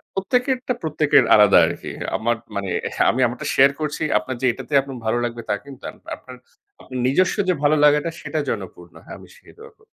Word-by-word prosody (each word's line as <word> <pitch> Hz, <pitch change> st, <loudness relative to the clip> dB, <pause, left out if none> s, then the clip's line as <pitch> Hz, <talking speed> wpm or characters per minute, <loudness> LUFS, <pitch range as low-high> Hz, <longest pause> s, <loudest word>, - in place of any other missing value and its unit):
প্রত্যেকেরটা 250 Hz, +5 st, 0 dB
প্রত্যেকের 150 Hz, -4 st, +3 dB
আলাদা 105 Hz, -2 st, +6 dB
আরকি। -, -, -6 dB, 0.3 s
আমার 120 Hz, +1 st, 0 dB, 0.2 s
মানে 100 Hz, -2 st, -3 dB, 0.4 s
আমি 130 Hz, -, -1 dB
আমারটা 120 Hz, +1 st, -5 dB
শেয়ার 135 Hz, +1 st, +6 dB
করছি। 150 Hz, +1 st, -3 dB, 0.2 s
আপনার 125 Hz, +5 st, -6 dB
যে -, -, +2 dB
এটাতে 150 Hz, -, -11 dB
আপনার 135 Hz, -1 st, -8 dB
ভালো 110 Hz, +2 st, 0 dB
লাগবে, 120 Hz, -1 st, -4 dB
তা -, -, +1 dB
কিন্তু 140 Hz, -2 st, -13 dB
আর -, -, -9 dB
না। -, -, -26 dB, 0.2 s
আপনার 130 Hz, -1 st, -13 dB, 0.4 s
আপনার 130 Hz, -1 st, -8 dB
নিজস্ব 185 Hz, +8 st, +2 dB
যে 180 Hz, -, +3 dB
ভালো 150 Hz, +1 st, +3 dB
লাগাটা, 150 Hz, +2 st, +4 dB
সেটা 155 Hz, -, -4 dB
জনপূর্ণ। 90 Hz, -4 st, -6 dB
হ্যাঁ, -, -, -10 dB
আমি -, -, -15 dB
সেই -, -, -19 dB
দোয়া 450 Hz, +1 st, -13 dB
করতেছি। 440 Hz, -, -26 dB
135 Hz, 200 wpm, -21 LUFS, 120-160 Hz, 0.4 s, আলাদা